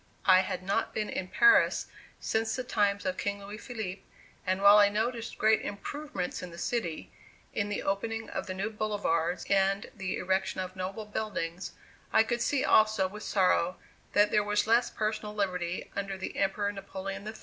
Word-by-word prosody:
I 185 -1 +7
had 185 0 -2
not 200 +4 -1
been 215 -1 -2
in 185 - -3
Paris 410 - +5 0.3
since 220 0 0
the 255 - -3
times 205 -5 +1
of 185 0 -1
King 200 0 -1
Louis 205 +2 -8
Philippe, 215 -7 -5 0.5
and 185 +1 +1
while 205 +1 +9
I 205 -1 +6
noticed 230 +2 -2
great 220 0 +4
improvements 245 -1 -5
in 180 - -6
the 170 - -11
city, 175 -4 -3 0.4
in 205 0 -1
the 205 - -2
opening 225 +3 -2
of - - -5
the 185 - -4
new 200 +4 -2
boulevards 205 -6 -1
and 195 0 +1
the 195 -3 -3
erection 190 +1 -1
of 185 0 -4
noble 190 +3 -4
buildings, 190 -5 -4 0.4
I 220 - +6
could 240 +1 -2
see 280 +3 +1
also 215 -3 +4
with 210 +3 -9
sorrow 185 -3 +2 0.4
that 205 0 +4
there 210 - +3
was 210 0 +1
less 230 +2 +3
personal 215 -1 -3
liberty 180 -3 -2
under 195 -1 -3
the 190 - -6
Emperor 200 +1 0
Napoleon 195 0 -6
III. 220 - -6
200 Hz, 180 wpm, -30 LUFS, 190-215 Hz, 0.5 s, while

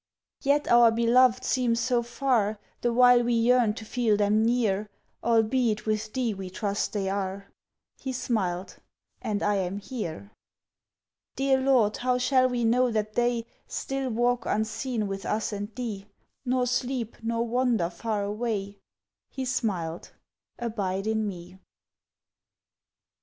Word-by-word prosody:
"Yet 290 +1 +2
our 240 -1 +7
beloved 235 +2 +4
seem 245 -3 +1
so 240 +1 +1
far, 235 -3 0 0.2
The 240 - +1
while 245 0 +6
we 240 0 +1
yearn 230 -2 +3
to 220 - -8
feel 220 -2 +1
them 210 +1 +3
near, 215 -3 +1 0.3
Albeit 225 -1 +2
with 215 0 -1
Thee 245 -3 -1
we 190 -1 -7
trust 200 +2 -2
they 200 -2 -1
are." 195 0 -3 0.5
He 265 - -4
smiled: 200 -8 -2 0.4
"And 205 -1 -2
I 205 -1 +2
am 190 0 -2
here!" 175 - -6 1.0
"Dear 270 0 +2
Lord, 250 -6 +3
how 250 0 +1
shall 255 0 +3
we 240 -2 -1
know 250 +2 +3
that 215 -2 -2
they 240 -1 +1 0.2
Still 270 -1 -3
walk 240 +1 0
unseen 220 +1 -1
with 195 0 -5
us 215 +1 -1
and 205 0 -4
Thee, 215 -5 -5 0.4
Nor 250 0 +1
sleep, 245 -2 -2
nor 230 +1 -1
wander 235 -7 +1
far 210 +3 -2
away?" 205 -1 -3 0.5
He 265 - -4
smiled: 190 -10 -2 0.4
"Abide 200 -5 -2
in 220 -1 0
Me." 180 -1 -8
230 Hz, 135 wpm, -27 LUFS, 205-245 Hz, 1.0 s, our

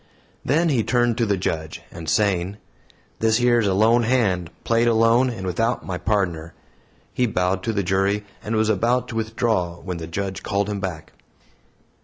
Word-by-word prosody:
Then 165 +5 +2
he 125 -7 +2
turned 120 -1 +1
to 115 - +2
the 100 -1 +1
Judge, 80 -3 -3
and 80 -2 -7
saying, 100 -2 +1 0.6
"This 110 +1 +2
yer 120 -1 +4
is 110 - +1
a 95 - +1
lone 115 +4 +4
hand, 110 -8 +1
played 115 +1 +2
alone, 115 +2 +4
and 110 -6 -6
without 115 +6 -1
my 90 -2 -4
pardner," 85 -6 -1 0.6
he 125 - +1
bowed 95 -2 0
to 115 - -1
the 100 -2 -1
jury 95 +3 0 0.2
and 110 +3 -2
was 110 0 +2
about 120 +4 +1
to 115 - -6
withdraw 110 -5 -1
when 90 0 -6
the 80 -1 -6
Judge 95 +3 -4
called 100 +1 -1
him 105 -1 -3
back. 90 -5 -6
105 Hz, 180 wpm, -22 LUFS, 95-115 Hz, 0.6 s, yer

